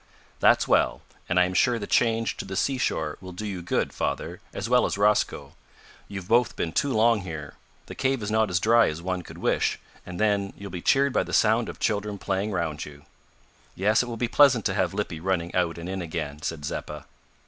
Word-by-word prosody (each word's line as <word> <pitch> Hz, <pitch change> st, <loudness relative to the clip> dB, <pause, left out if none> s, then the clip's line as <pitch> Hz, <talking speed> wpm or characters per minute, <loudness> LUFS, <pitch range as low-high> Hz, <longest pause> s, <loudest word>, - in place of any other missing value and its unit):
"That's -, -, +4 dB
well, -, -, +2 dB, 0.3 s
and 90 Hz, -, +3 dB
I 90 Hz, -, +5 dB
am 90 Hz, -, -3 dB
sure 120 Hz, +5 st, +3 dB
the 105 Hz, -, -4 dB
change 115 Hz, +1 st, +1 dB
to -, -, -4 dB
the 95 Hz, 0 st, -6 dB
seashore 90 Hz, -, -1 dB
will 95 Hz, -1 st, -9 dB
do 105 Hz, +5 st, -6 dB
you 95 Hz, -4 st, -4 dB
good, 85 Hz, -, -1 dB
father, -, -, -3 dB
as -, -, -4 dB
well 125 Hz, +1 st, +4 dB
as -, -, -3 dB
Rosco. 105 Hz, +1 st, +1 dB, 0.5 s
You've 95 Hz, -3 st, -7 dB
both 120 Hz, +2 st, +3 dB
been 80 Hz, -, -2 dB
too 140 Hz, -, 0 dB
long 115 Hz, -1 st, +3 dB
here. 80 Hz, -6 st, -7 dB, 0.3 s
The -, -, -9 dB
cave 130 Hz, -3 st, 0 dB
is 105 Hz, -, -3 dB
not 110 Hz, -1 st, +2 dB
as 90 Hz, -2 st, +1 dB
dry 115 Hz, +4 st, +5 dB
as 75 Hz, -, -5 dB
one 90 Hz, +1 st, -3 dB
could -, -, -12 dB
wish -, -, +1 dB, 0.3 s
and, 90 Hz, -1 st, -8 dB
then, 100 Hz, -2 st, +1 dB
you'll 100 Hz, -1 st, -8 dB
be 90 Hz, -1 st, -5 dB
cheered 140 Hz, +5 st, +3 dB
by -, -, +3 dB
the -, -, -6 dB
sound 115 Hz, +1 st, +3 dB
of -, -, -9 dB
children 105 Hz, -1 st, -1 dB
playing 95 Hz, +2 st, -2 dB
round 85 Hz, -6 st, -2 dB
you." 75 Hz, -1 st, -12 dB, 0.7 s
"Yes, 105 Hz, +3 st, +3 dB
it 125 Hz, -, -4 dB
will 115 Hz, -1 st, -5 dB
be 120 Hz, -, 0 dB
pleasant 130 Hz, -4 st, +5 dB
to -, -, +1 dB
have 95 Hz, 0 st, 0 dB
Lippy 100 Hz, -6 st, -3 dB
running 85 Hz, -1 st, -1 dB
out 90 Hz, -2 st, 0 dB
and 85 Hz, +1 st, -7 dB
in 95 Hz, 0 st, -3 dB
again," 80 Hz, -3 st, -5 dB
said 80 Hz, -1 st, -4 dB
Zeppa. 75 Hz, -1 st, -5 dB
95 Hz, 220 wpm, -26 LUFS, 85-110 Hz, 0.7 s, I